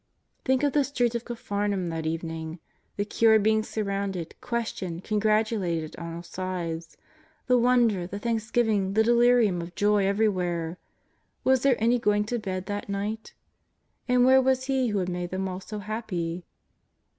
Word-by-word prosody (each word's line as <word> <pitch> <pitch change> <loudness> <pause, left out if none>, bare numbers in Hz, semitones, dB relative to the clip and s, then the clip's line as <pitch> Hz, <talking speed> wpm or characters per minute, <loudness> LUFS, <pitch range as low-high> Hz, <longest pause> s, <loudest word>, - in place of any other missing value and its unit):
'' - - -46
Think 265 +1 +2
of 285 - +2
the 290 - +4
streets 245 -4 0
of 235 0 -3
Capharnaum 205 -5 -2
that 160 -1 -3
evening: 160 0 -4 0.4
the 205 - 0
cured 220 0 +4
being 220 0 +3
surrounded, 200 -5 -3
questioned, 190 -7 -3
congratulated 210 -6 0
on 170 -1 -6
all 170 - -7
sides; 170 -3 -5 0.5
the 250 - +3
wonder, 235 -7 +3
the 200 - -6
thanksgiving, 220 -3 0
the 220 - +5
delirium 235 -5 +4
of 170 0 -8
joy 205 -1 +3
everywhere. 180 -5 0 0.6
Was 260 -1 +3
there 275 -2 +4
any 235 +3 +2
going 210 -2 +2
to 235 +3 -2
bed 190 -3 -4
that 205 0 -4
night? 205 +3 -4 0.7
And 250 -1 +4
where 265 +1 +6
was 260 0 +2
He 265 -1 +1
who 210 -2 -1
had 185 -2 -1
made 175 0 -3
them 190 +1 -2
all 185 0 -4
so 210 +3 -7
happy 185 -5 -4
205 Hz, 160 wpm, -27 LUFS, 180-235 Hz, 0.7 s, where